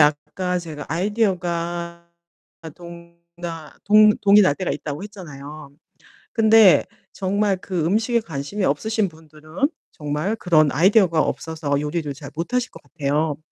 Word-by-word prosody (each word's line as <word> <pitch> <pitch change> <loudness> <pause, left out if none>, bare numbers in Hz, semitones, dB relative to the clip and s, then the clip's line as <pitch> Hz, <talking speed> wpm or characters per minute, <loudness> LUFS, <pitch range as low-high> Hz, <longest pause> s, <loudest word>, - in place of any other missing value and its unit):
아까 165 +5 +1
제가 155 -4 -8
아이디어가 170 -3 -2 0.5
아 160 - -8
동 170 +1 -13 0.2
나 165 -3 -7
동 215 +1 +7
동이 205 +1 +6
날 165 -7 +3
때가 185 +3 -3
있다고 150 +3 -5
했잖아요. 150 -7 -10 0.6
근데 220 - +6 0.3
정말 200 +1 0
그 175 -5 -2
음식에 225 +6 +1
관심이 175 +2 -4
없으신 215 +9 0
분들은 160 - -4 0.2
정말 150 +8 -2
그런 155 -7 +3
아이디어가 180 -1 +4
없어서 155 -3 -2
요리를 150 0 -3
잘 145 0 -10
못 170 +9 -5
하실 250 0 0
것 - - -14
같아요. 150 +1 -1
170 Hz, 290 characters per minute, -22 LUFS, 155-200 Hz, 0.6 s, 동